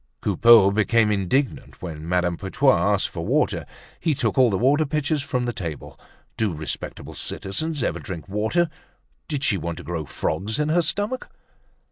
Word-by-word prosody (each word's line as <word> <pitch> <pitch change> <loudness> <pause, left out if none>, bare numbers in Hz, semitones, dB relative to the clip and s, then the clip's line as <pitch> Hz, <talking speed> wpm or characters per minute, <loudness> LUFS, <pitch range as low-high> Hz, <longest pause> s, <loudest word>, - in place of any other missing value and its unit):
Coupeau 115 -4 +6
became 105 +1 +3
indignant 105 +8 -1
when 80 -2 -7
Madame 90 -1 +1
Putois 95 +2 +2 0.2
asked - - 0
for - - -5
water. - - 0 0.3
He 155 -3 +1
took - - 0
all 130 -3 +5
the 95 - 0
water 140 +8 +3
pitchers 150 0 -1
from 125 -2 -2
the 120 - -2
table. 85 -8 -6 0.4
Do 105 -7 0
respectable 75 0 -6
citizens 145 +8 -3
ever - - -1
drink 85 -2 -7
water? 110 - 0 0.6
Did 145 -3 -3
she 100 - +2
want 85 -1 -4
to - - -8
grow 80 0 -4
frogs 100 - -2
in 150 0 0
her 170 +3 +3
stomach? 205 +9 -2
110 Hz, 165 wpm, -23 LUFS, 90-145 Hz, 0.6 s, Coupeau